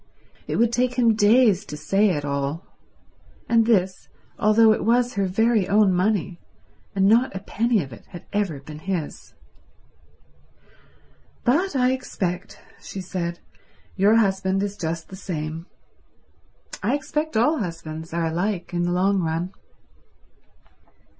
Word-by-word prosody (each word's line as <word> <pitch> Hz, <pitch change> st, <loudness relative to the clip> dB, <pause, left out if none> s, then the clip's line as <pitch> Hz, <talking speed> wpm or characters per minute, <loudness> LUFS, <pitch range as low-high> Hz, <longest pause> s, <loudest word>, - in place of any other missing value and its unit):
It -, -, -2 dB
would 235 Hz, 0 st, +2 dB
take 250 Hz, +1 st, +1 dB
him 235 Hz, -2 st, +4 dB
days 215 Hz, -1 st, +4 dB
to 150 Hz, -, -7 dB
say 200 Hz, +6 st, +2 dB
it 145 Hz, -5 st, -1 dB
all; 140 Hz, +3 st, -3 dB, 0.8 s
and 230 Hz, -1 st, +3 dB
this 190 Hz, -5 st, +1 dB, 0.3 s
although 215 Hz, +1 st, +5 dB
it -, -, -3 dB
was 245 Hz, +2 st, +2 dB
her 200 Hz, -2 st, 0 dB
very 220 Hz, +1 st, +2 dB
own 205 Hz, -2 st, +4 dB
money, 185 Hz, -2 st, 0 dB, 0.6 s
and 195 Hz, -1 st, +3 dB
not 230 Hz, +2 st, +3 dB
a -, -, -3 dB
penny 220 Hz, +1 st, 0 dB
of 135 Hz, -3 st, -11 dB
it 110 Hz, -, -14 dB
had 175 Hz, -, -11 dB
ever 200 Hz, -8 st, -1 dB
been 150 Hz, +2 st, -10 dB
his. 180 Hz, -3 st, -5 dB, 2.1 s
"But 315 Hz, +8 st, +1 dB
I 255 Hz, -1 st, +3 dB
expect," 185 Hz, -8 st, -4 dB, 0.2 s
she 195 Hz, -, -8 dB
said, 175 Hz, -2 st, -4 dB, 0.5 s
"your 200 Hz, +3 st, +4 dB
husband 195 Hz, -3 st, +1 dB
is 205 Hz, 0 st, -3 dB
just 165 Hz, -2 st, -4 dB
the 190 Hz, -, -9 dB
same. 165 Hz, -3 st, -5 dB, 1.1 s
I 235 Hz, +7 st, +1 dB
expect 300 Hz, -1 st, -2 dB
all 280 Hz, +7 st, +3 dB
husbands 165 Hz, -4 st, -6 dB
are 170 Hz, 0 st, -1 dB
alike 175 Hz, +2 st, -2 dB
in 175 Hz, -, 0 dB
the 175 Hz, 0 st, 0 dB
long 195 Hz, +2 st, +2 dB
run." 165 Hz, +2 st, -2 dB
195 Hz, 140 wpm, -23 LUFS, 170-225 Hz, 2.1 s, although